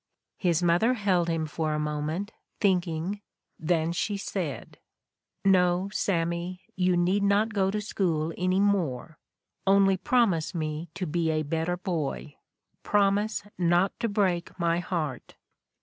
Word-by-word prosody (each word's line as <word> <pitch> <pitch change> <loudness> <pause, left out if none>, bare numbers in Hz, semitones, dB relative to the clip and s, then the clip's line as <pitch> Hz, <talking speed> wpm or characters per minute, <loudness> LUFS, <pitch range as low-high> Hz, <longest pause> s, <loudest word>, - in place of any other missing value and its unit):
His 175 -2 +1
mother 175 +9 +3
held 185 -6 +1
him 165 -1 0
for 155 0 -2
a - - -1
moment, 150 +7 -2 0.3
thinking, 180 0 0 0.4
then 165 0 +1
she 200 +4 -1
said: 185 -6 -5 0.7
'No, 180 0 +3
Sammy, 170 0 -1
you 180 -1 +2
need 180 +4 +2
not 205 +2 +2
go 190 -2 +2
to 210 +2 -1
school 165 -6 -1
any 185 +1 +1
more. 170 -8 0 0.5
Only 195 -1 +5
promise 200 - +1
me 155 0 -3
to 185 - -3
be 165 0 0
a 155 -1 0
better 165 +4 -1
boy. 165 -6 -3 0.5
Promise 205 +1 +1 0.2
not 175 +2 +3
to 230 - 0
break 185 -4 0
my 170 0 +2
heart.' 165 -6 -4
175 Hz, 135 wpm, -27 LUFS, 165-195 Hz, 0.7 s, Only